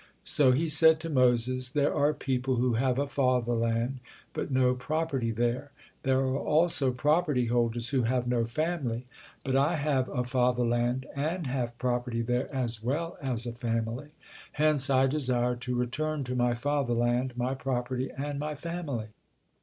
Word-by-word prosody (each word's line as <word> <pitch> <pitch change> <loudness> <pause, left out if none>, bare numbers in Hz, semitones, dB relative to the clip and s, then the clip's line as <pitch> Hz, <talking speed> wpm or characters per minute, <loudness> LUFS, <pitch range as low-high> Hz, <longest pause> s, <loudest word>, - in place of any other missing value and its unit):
So 140 -3 +4
he 150 +6 +1
said 160 +1 +6
to 165 0 -4
Moses: 125 -1 +2
"There 145 +1 +1
are 145 0 +3
people 130 -3 -1
who 125 0 +1
have 125 +2 +1
a 140 - +1
fatherland, 120 -2 0 0.3
but - - -3
no 130 -1 +3
property 140 -1 -2
there; 120 +5 -1 0.3
there 130 -1 +2
are 135 0 0
also 150 -3 +2
property 150 0 +1
holders 120 0 0
who 135 -2 +1
have 125 +1 0
no 120 -1 +1
family; 130 -3 -2 0.4
but 135 -1 -1
I 145 +5 +3
have 140 -4 0
a 125 - -1
fatherland, 125 0 +1
and 160 +5 -2
have 125 -2 -2
property 120 -2 -1
there 125 +2 -1
as 120 -5 -2
well 150 +8 -2
as 125 -4 -2
a 120 - -4
family; 115 +3 -2 0.5
hence 150 -2 +2
I 135 0 +4
desire 125 -3 +1
to 125 0 -3
return 145 +5 -1
to 125 0 -4
my 120 -1 +2
fatherland, 120 -2 0
my 125 +2 0
property, 130 -1 -2
and 140 +1 -4
my 150 +1 -3
family." 145 -8 -4
130 Hz, 160 wpm, -29 LUFS, 120-145 Hz, 0.5 s, said